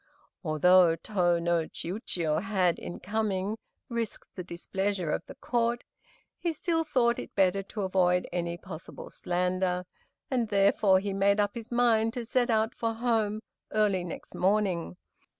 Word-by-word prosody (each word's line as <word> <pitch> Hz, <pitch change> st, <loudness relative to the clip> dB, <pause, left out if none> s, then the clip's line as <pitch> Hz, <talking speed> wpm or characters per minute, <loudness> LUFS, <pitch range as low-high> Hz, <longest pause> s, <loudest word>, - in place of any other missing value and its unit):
Although 170 Hz, +2 st, +5 dB
Tô 175 Hz, -2 st, +1 dB
no 170 Hz, -1 st, +1 dB
Chiûjiô 170 Hz, -5 st, -2 dB
had, 190 Hz, -4 st, +1 dB
in 175 Hz, -, -7 dB
coming, 210 Hz, 0 st, -1 dB, 0.3 s
risked 235 Hz, -3 st, -4 dB
the 180 Hz, -, -6 dB
displeasure 185 Hz, 0 st, -2 dB
of -, -, -1 dB
the -, -, -10 dB
Court, 235 Hz, 0 st, 0 dB, 0.6 s
he 340 Hz, -2 st, -1 dB
still 325 Hz, +1 st, 0 dB
thought 245 Hz, -6 st, +2 dB
it -, -, -8 dB
better 195 Hz, 0 st, +3 dB
to 205 Hz, +2 st, -6 dB
avoid 180 Hz, -1 st, +2 dB
any 170 Hz, -1 st, -2 dB
possible 175 Hz, -2 st, -9 dB
slander, 180 Hz, 0 st, -1 dB, 0.5 s
and 245 Hz, -3 st, +1 dB
therefore 200 Hz, -1 st, +4 dB
he 200 Hz, 0 st, -3 dB
made 200 Hz, +1 st, +3 dB
up 205 Hz, 0 st, +1 dB
his 235 Hz, -1 st, -8 dB
mind 230 Hz, -2 st, +3 dB
to 245 Hz, -2 st, -4 dB
set 245 Hz, +1 st, +1 dB
out 220 Hz, 0 st, +2 dB
for 230 Hz, -1 st, -2 dB
his 225 Hz, -, -12 dB
home 220 Hz, -3 st, +1 dB, 0.3 s
early 205 Hz, -4 st, +2 dB
next 175 Hz, -, -8 dB
morning. 190 Hz, -3 st, 0 dB
195 Hz, 150 wpm, -29 LUFS, 180-225 Hz, 0.6 s, Although